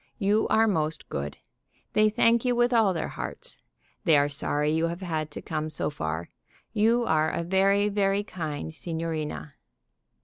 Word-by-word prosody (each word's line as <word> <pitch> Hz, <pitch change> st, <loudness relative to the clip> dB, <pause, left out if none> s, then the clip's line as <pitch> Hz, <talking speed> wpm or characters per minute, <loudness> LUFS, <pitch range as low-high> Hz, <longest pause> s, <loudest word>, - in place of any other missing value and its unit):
You 210 Hz, 0 st, +2 dB
are 225 Hz, +1 st, +4 dB
most 160 Hz, -6 st, -1 dB
good. 70 Hz, +1 st, -4 dB, 0.6 s
They 215 Hz, 0 st, +4 dB
thank 230 Hz, +1 st, +3 dB
you 250 Hz, -1 st, +1 dB
with 240 Hz, +1 st, +3 dB
all 220 Hz, -4 st, +4 dB
their 165 Hz, -3 st, -2 dB
hearts. -, -, -7 dB, 0.4 s
They 160 Hz, -3 st, +5 dB
are 145 Hz, 0 st, +3 dB
sorry 145 Hz, +1 st, -1 dB
you 160 Hz, +1 st, +1 dB
have 170 Hz, +2 st, -5 dB
had 160 Hz, -4 st, -2 dB
to 145 Hz, -, -8 dB
come 155 Hz, -1 st, -3 dB
so 155 Hz, -, -2 dB
far. 80 Hz, -, -4 dB, 0.4 s
You 230 Hz, +2 st, +3 dB
are 155 Hz, -4 st, +2 dB
a 170 Hz, -, -2 dB
very, 195 Hz, +3 st, +3 dB
very 200 Hz, -1 st, +1 dB
kind 160 Hz, -5 st, -5 dB
signorina." 160 Hz, -3 st, -4 dB
170 Hz, 165 wpm, -27 LUFS, 155-210 Hz, 0.6 s, They